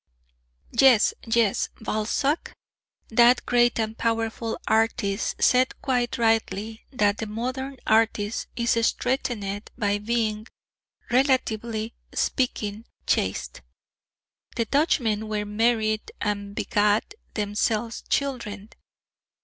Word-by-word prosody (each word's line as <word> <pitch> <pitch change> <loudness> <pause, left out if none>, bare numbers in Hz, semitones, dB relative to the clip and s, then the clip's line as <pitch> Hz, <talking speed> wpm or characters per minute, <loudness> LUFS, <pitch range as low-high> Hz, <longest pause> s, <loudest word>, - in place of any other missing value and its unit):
Yes, 240 -2 +5
yes, 225 -3 +2
Balzac, 225 +8 -1 0.5
that 240 +2 +5
great 240 -1 +3
and 220 0 -1
powerful 225 0 -1
artist, 220 -3 +1
said 255 +1 +3
quite 245 -2 0
rightly 225 -1 0
that 210 -5 +1
the 220 - -3
modern 255 +5 -4
artist 220 -1 +1
is 235 -1 +1
strengthened 220 -5 -1
by 205 -1 0
being, 215 0 -1 0.6
relatively 235 -4 +1 0.2
speaking, 220 -4 -1 0.2
chaste. 95 -7 -1 0.9
The 230 - 0
Dutchmen 225 -6 +1
were 210 -1 -1
married 215 0 +1
and 205 -1 -3
begat 210 - +1 0.2
themselves 215 +2 -1
children. 230 -7 -2
225 Hz, 95 wpm, -25 LUFS, 210-240 Hz, 0.9 s, Yes